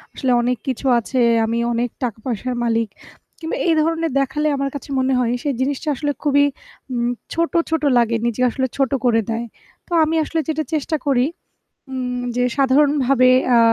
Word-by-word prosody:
আসলে 260 -3 0
অনেক 245 +1 0
কিছু 265 +1 -3
আছে। 250 +3 -1 0.2
আমি 230 +1 -1 0.2
অনেক 240 +1 0
টাকা-পয়সার 240 +1 -3
মালিক 230 -1 +1 0.5
কিংবা 325 0 -4
এই 335 - +4
ধরনের 330 0 0
দেখালে 295 +3 -1
আমার 275 0 -1
কাছে 285 - -7
মনে 260 +1 +1
হয় 240 -2 +1
সেই 285 - 0
জিনিসটা 285 +3 -1
আসলে 290 +2 -1
খুবই 285 -1 +4 0.5
উম 240 -1 0 0.2
ছোট, 335 0 0 0.2
ছোট 320 -1 -1
লাগে 235 -1 +2
নিজে 235 +1 -1
আসলে 260 +2 -1
ছোট 270 -2 +1
করে 225 -2 +4
দেয়। 230 +1 -2 0.4
তো - - -25
আমি 315 +1 0
আসলে 325 +1 -2
যেটা 315 -1 -1
চেষ্টা 310 +1 0
করি 255 -3 +3 0.7
উম 250 -1 -3 0.2
যে 245 - +1
সাধারণভাবে 275 -2 +4 0.3
আ - - +6
260 Hz, 170 wpm, -20 LUFS, 240-295 Hz, 0.7 s, আ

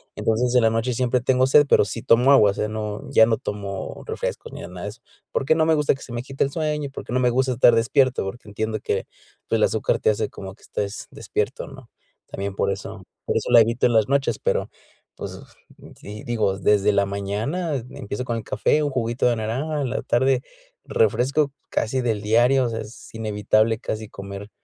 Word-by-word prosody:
Entonces, 120 +3 0
en 125 - +6
la 115 - +4
noche 115 +3 -1
siempre 125 +1 +1
tengo 130 +1 +2
sed, 145 +2 +6
pero - - +5
sí 105 +3 -5
tomo 125 +4 +5
agua, 105 -7 +6
o - - -6
sea, 105 - -2
no, 105 -1 -4
ya 110 - +7
no 115 0 +2
tomo 100 -1 -5
refrescos - - -4
ni - - -7
nada 90 0 -8
de - - -3
eso. 115 +3 -13 0.3
Porque 135 +3 +2
no 160 - +3
me 160 - +3
gusta 150 -1 +2
que 135 - -15
se 120 - -9
me 120 +1 -3
quite 135 +1 -1
el 140 - -3
sueño 150 -1 -2
y - - -5
porque 135 - -8
no 125 - +1
me 125 -1 +3
gusta 130 +2 +1
estar 120 -1 +5
despierto, 120 +3 +2
porque 105 +3 -7
entiendo 110 +1 -3
que, - - -1 0.5
pues, - - +2
el - - +3
azúcar - - 0
te - - +3
hace 110 0 -2
como 95 0 -9
que - - -28
estés 100 0 -4
despierto, - - -3
¿no? - - -13 0.4
También 100 0 -5
por 100 - +1
eso, 100 0 -7 0.2
por - - -1
eso - - -2
la 120 - +9
evito 115 +2 +1
en 120 - +3
las 110 -2 +4
noches, 135 -4 +1
pero, - - 0 0.5
pues - - -7 0.6
si 105 +1 -9
digo, 110 -5 0
desde 105 +1 +3
la 100 0 +2
mañana 105 - -2
empiezo 125 -2 -5
con 120 -2 -2
el 110 - -5
café, 150 - +1
un 145 - 0
juguito 120 -2 0
de 120 - +2
naranja, 135 +8 -2
en 130 - -1
la - - -2
tarde, 130 +1 +2 0.4
refresco 145 - +1 0.2
casi 130 +4 0
del 115 -4 -1
diario, 120 +5 +4
o - - -1
sea, 115 -1 -4
es 110 +2 -12
inevitable 110 0 +1
casi 110 -3 -5
comer, 100 +1 -8
115 Hz, 220 wpm, -23 LUFS, 105-130 Hz, 0.6 s, la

